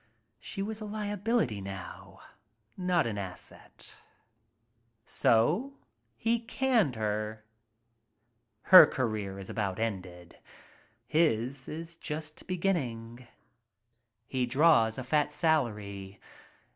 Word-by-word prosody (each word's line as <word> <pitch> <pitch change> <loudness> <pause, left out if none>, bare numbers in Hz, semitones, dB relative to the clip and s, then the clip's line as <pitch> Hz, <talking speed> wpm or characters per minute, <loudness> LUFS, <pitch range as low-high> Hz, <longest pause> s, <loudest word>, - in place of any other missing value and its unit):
She 195 - -5
was 215 +1 -5
a - - -4
liability 205 - -1
now, 95 -2 -9 0.5
not 180 -2 +1
an 105 -3 -3
asset. 95 -2 -9 1.1
So 165 - +2 0.4
he 230 +1 +1
canned 230 - +1
her. 110 0 -3 1.2
Her 185 - +10
career 110 -6 -3
is 95 -1 -8
about 100 -3 -2
ended. 90 -6 -5 0.7
His 135 -4 0
is 165 +2 -7
just 155 -1 -7
beginning. 125 -11 -2 1.0
"He 125 0 -1
draws 130 -5 +4
a 130 - -4
fat 150 +3 +1
salary. 105 - -1
130 Hz, 95 wpm, -30 LUFS, 105-175 Hz, 1.2 s, Her